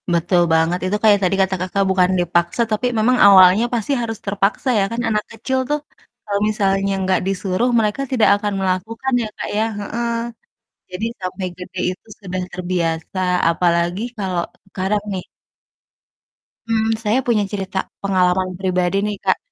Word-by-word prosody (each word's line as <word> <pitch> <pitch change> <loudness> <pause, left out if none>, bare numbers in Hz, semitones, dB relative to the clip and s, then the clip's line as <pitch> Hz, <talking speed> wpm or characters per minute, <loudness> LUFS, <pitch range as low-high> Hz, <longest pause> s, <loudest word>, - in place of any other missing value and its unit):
Betul 175 +1 +2
banget, 165 +2 +2
itu 195 +3 0
kayak 210 -2 +6
tadi 185 +1 +2
kata 190 0 +1
Kakak, 190 +2 0
bukan 185 -1 +3
dipaksa 175 +4 +1
tapi 215 +4 +1
memang 250 +4 +3
awalnya 190 +1 +7
pasti 235 +2 -1
harus 225 -1 -3
terpaksa 200 +5 0
ya, - - +3
kan 230 +1 -2
anak 210 -1 0
kecil 245 +4 -2
tuh 295 0 +1 0.5
kalau 200 -1 -1
misalnya 195 -2 +1
nggak 185 0 +2
disuruh, 195 +4 0
mereka 215 +4 0
tidak 240 -4 +4
akan 205 0 -2
melakukan 220 +8 -2
ya, - - -3
Kak, - - -4
ya, 215 - +2 0.2
heeh. 235 +3 -3 0.8
Jadi 180 +5 -3 0.2
sampai 185 +1 -4
gede 185 +1 -9
itu 185 - -10
sudah 185 -2 -4
terbiasa, 175 -1 -2 0.3
apalagi 170 +2 +1 0.2
kalau 185 -3 -1 0.3
sekarang, 195 +2 -1
nih. 185 -2 -4 1.5
Mmm, 220 -1 +1 0.2
saya 215 +4 +2
punya 225 -3 +3
cerita, 195 -2 -4 0.2
pengalaman 185 -1 +1
pribadi 185 -1 0
nih, 210 -1 -3
Kak, - - +2
195 Hz, 155 wpm, -19 LUFS, 185-215 Hz, 1.5 s, awalnya